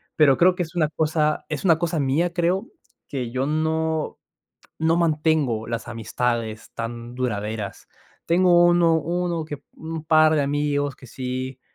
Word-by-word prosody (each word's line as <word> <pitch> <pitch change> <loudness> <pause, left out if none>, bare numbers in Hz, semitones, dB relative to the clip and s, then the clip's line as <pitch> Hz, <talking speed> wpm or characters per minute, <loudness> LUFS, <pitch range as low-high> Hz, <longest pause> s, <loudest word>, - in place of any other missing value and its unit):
Pero 140 -4 +5
creo 180 +1 +5
que 180 - -1
es 165 0 -10
una 160 -3 +2
cosa 155 0 0
es 155 +2 -4
una 165 -4 +5
cosa 170 -1 -1
mía, 150 +6 +1
creo, 180 +2 0 0.4
que 125 -4 -4
yo 130 +2 -1
no 160 +1 -1 0.6
no 160 +1 +2
mantengo 155 -9 +1
las 115 -1 -4
amistades 115 -1 -3
tan 120 +1 -6
duraderas. 105 -4 -3 0.4
Tengo 175 0 +5
uno 175 -1 +4
uno 170 +1 -1
que 145 -2 -7
un 160 0 -6
par 155 0 +5
de 155 - +2
amigos 145 -1 -1
que 130 - -14
sí, 130 +1 -5
155 Hz, 155 wpm, -23 LUFS, 130-165 Hz, 0.6 s, Pero